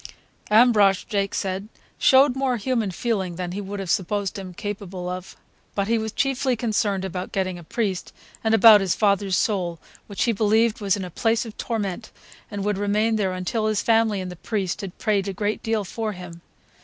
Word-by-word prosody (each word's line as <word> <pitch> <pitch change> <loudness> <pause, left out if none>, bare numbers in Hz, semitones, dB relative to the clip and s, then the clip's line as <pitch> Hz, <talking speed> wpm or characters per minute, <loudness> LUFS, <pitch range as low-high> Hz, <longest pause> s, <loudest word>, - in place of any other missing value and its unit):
Ambrosch, 210 -4 +5
Jake 200 -1 -2
said, 190 +1 -2 0.3
showed 265 0 +5
more 265 -2 0
human 230 -2 -1
feeling 190 -2 -2
than 180 0 -4
he 200 +3 -4
would 200 +1 -6
have 190 -3 -2
supposed 200 0 -1
him 185 -2 -7
capable 190 -1 -6
of; 180 +1 -6 0.4
but 200 -1 0
he 230 0 +2
was 220 0 -3
chiefly 265 0 0
concerned 210 -4 0
about 180 0 -5
getting 185 -2 -2
a - - -11
priest, 195 0 -2 0.3
and 220 0 +3
about 220 -2 +8
his 190 -3 0
father's 200 -2 +2
soul, 180 -6 0 0.3
which 200 - -2
he 235 - +2
believed 220 +1 +2
was 200 0 +1
in 190 - -4
a 180 - -8
place 225 +5 +1
of 220 - -9
torment 215 -2 -3 0.4
and 205 -2 -4
would 205 -1 0
remain 210 +2 +1
there 195 -3 0
until 185 +4 -1
his 215 -1 0
family 225 -3 +3
and 185 -1 -5
the - - -8
priest 195 -2 -2
had 195 -3 -7
prayed 205 -3 0
a 195 - -2
great 205 +3 -2
deal 220 -2 0
for 215 +2 -4
him. 175 -2 -10
205 Hz, 195 wpm, -24 LUFS, 190-220 Hz, 0.4 s, about